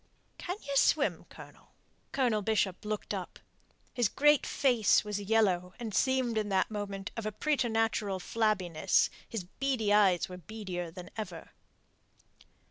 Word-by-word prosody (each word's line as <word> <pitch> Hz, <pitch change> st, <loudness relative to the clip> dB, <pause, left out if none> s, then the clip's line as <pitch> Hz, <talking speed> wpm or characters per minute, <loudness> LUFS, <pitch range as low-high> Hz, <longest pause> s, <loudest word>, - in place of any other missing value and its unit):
"Can 360 Hz, +2 st, -4 dB
ye 280 Hz, 0 st, -4 dB
swim, -, -, +2 dB
Colonel?" -, -, -14 dB, 0.4 s
Colonel 240 Hz, -6 st, +1 dB
Bishop 205 Hz, -2 st, 0 dB
looked 210 Hz, -1 st, -3 dB
up. -, -, -5 dB, 0.6 s
His 240 Hz, -4 st, +2 dB
great 295 Hz, 0 st, +3 dB
face 245 Hz, -6 st, +3 dB
was 210 Hz, -1 st, -3 dB
yellow 195 Hz, -4 st, +1 dB
and 225 Hz, -3 st, -5 dB
seemed 255 Hz, -3 st, +1 dB
in 210 Hz, -1 st, -2 dB
that 190 Hz, +2 st, +1 dB
moment 200 Hz, -2 st, -5 dB
of 225 Hz, -2 st, -4 dB
a -, -, -2 dB
preternatural 225 Hz, -6 st, 0 dB
flabbiness; 190 Hz, -6 st, +1 dB, 0.2 s
his 225 Hz, -5 st, -4 dB
beady 225 Hz, +2 st, -1 dB
eyes 195 Hz, -4 st, +4 dB
were 180 Hz, 0 st, -9 dB
beadier 180 Hz, -2 st, -6 dB
than 180 Hz, +1 st, -10 dB
ever. 215 Hz, -, -6 dB
215 Hz, 135 wpm, -31 LUFS, 195-235 Hz, 0.6 s, eyes